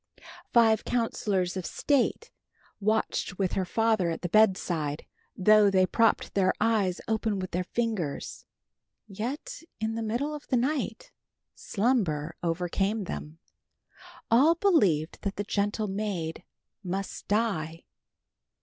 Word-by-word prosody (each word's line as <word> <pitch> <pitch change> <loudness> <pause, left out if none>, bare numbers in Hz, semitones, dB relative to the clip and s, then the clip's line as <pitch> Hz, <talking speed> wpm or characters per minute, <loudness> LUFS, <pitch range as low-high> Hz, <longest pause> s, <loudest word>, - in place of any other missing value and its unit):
Five 225 -2 +4
counselors 205 -6 -1
of 185 - -3
state 280 - 0 0.5
watched 215 -3 0
with 190 -2 0
her 190 - 0
father 220 -2 +1
at 165 - -4
the 175 - -2
bedside. 175 -7 +2 0.3
Though 210 +1 +6
they 190 -1 +4
propped 225 +4 +1
their 190 -2 +3
eyes 205 -6 +1
open 220 -1 0
with 185 -1 -5
their 180 +1 -1
fingers, 215 -10 -3 0.6
yet 255 - -5 0.2
in 220 +1 -1
the 230 - -3
middle 240 +7 -2
of 300 -1 -8
the 255 - +2
night 250 -3 -2 0.4
slumber 185 - 0
overcame 180 +5 -1
them. 155 -3 -6 0.9
All 285 +9 +6
believed 205 - +2
that 200 0 -3
the 205 - -2
gentle 205 +1 -1
maid 190 -5 -3 0.4
must 190 +1 -4
die. 190 -7 -1
205 Hz, 120 wpm, -28 LUFS, 180-225 Hz, 0.9 s, Though